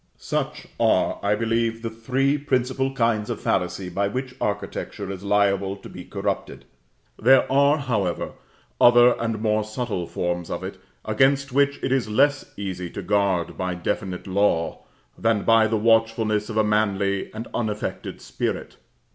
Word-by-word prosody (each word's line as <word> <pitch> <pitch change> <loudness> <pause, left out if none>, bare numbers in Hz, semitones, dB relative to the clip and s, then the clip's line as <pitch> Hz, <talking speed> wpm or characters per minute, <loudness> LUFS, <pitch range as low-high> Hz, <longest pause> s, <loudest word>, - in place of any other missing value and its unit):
Such - - -3
are, - - +2
I 100 +1 +2
believe, 115 +1 -1
the 115 - -3
three 130 +5 0
principal 135 -2 0
kinds 115 -5 0
of - - -3
fallacy 90 0 -1
by 100 +3 -1
which 130 +5 -4
architecture 100 -1 -3
is 95 -1 -7
liable 100 -1 +1
to - - -12
be - - -10
corrupted; - - -4 0.6
there 130 +4 +6
are, 140 +2 +4
however, 110 - -1 0.5
other 120 0 +7
and 115 -2 -2
more 110 -1 +2
subtle 110 -5 -3
forms 90 -1 -3
of - - -4
it, - - -6 0.3
against 135 0 +2
which 140 +1 +3
it - - 0
is 130 -5 +1
less 140 +6 +2
easy 90 -3 -4
to 100 - -7
guard 100 -3 0
by 90 -1 -1
definite 90 +1 -3
law, 95 -4 0 0.3
than 115 -2 +2
by 115 -1 +5
the 110 0 0
watchfulness 110 -1 +2
of 110 - -4
a 110 - +4
manly 100 -2 0
and 110 +2 -6
unaffected 105 -2 -3
spirit. - - -4
110 Hz, 155 wpm, -24 LUFS, 100-120 Hz, 0.6 s, other